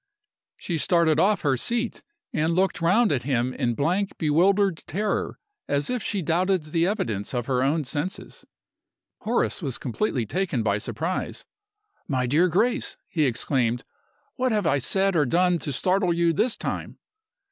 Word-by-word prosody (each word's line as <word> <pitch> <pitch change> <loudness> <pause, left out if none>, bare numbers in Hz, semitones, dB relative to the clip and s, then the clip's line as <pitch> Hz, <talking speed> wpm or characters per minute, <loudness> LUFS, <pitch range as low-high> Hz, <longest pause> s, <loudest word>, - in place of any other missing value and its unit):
She 170 -3 -3
started 165 -2 +3
off 200 +4 +3
her 140 -3 +2
seat, 235 - -2 0.3
and 160 +2 +1
looked 190 -1 +1
round 190 +5 +3
at 135 -4 +1
him 125 -1 0
in 120 -2 -1
blank, 180 - 0
bewildered 185 +4 +3
terror, 205 +6 -2 0.3
as 145 +9 0
if 250 -2 -1
she 200 -3 -2
doubted 180 +3 +1
the 165 +3 0
evidence 120 - -2
of 120 -1 -1
her 125 -1 0
own 150 +4 +1
senses. 150 +7 -4 0.8
Horace 230 -2 0
was 135 -7 -3
completely 125 - -2
taken 170 - -1
by 105 -1 +1
surprise. 165 - -3 0.6
"My 130 -3 0
dear 155 +9 +3
Grace!" 220 +8 0
he 155 -3 +1
exclaimed; 125 -1 0 0.5
"what 255 -1 +1
have 210 -4 +1
I 145 - +2
said 195 +7 +1
or 150 -4 +3
done 175 +4 +2
to 145 - -3
startle 185 +6 +1
you 170 0 +2
this 235 +8 +1
time?" - - -4
165 Hz, 160 wpm, -25 LUFS, 135-195 Hz, 0.8 s, started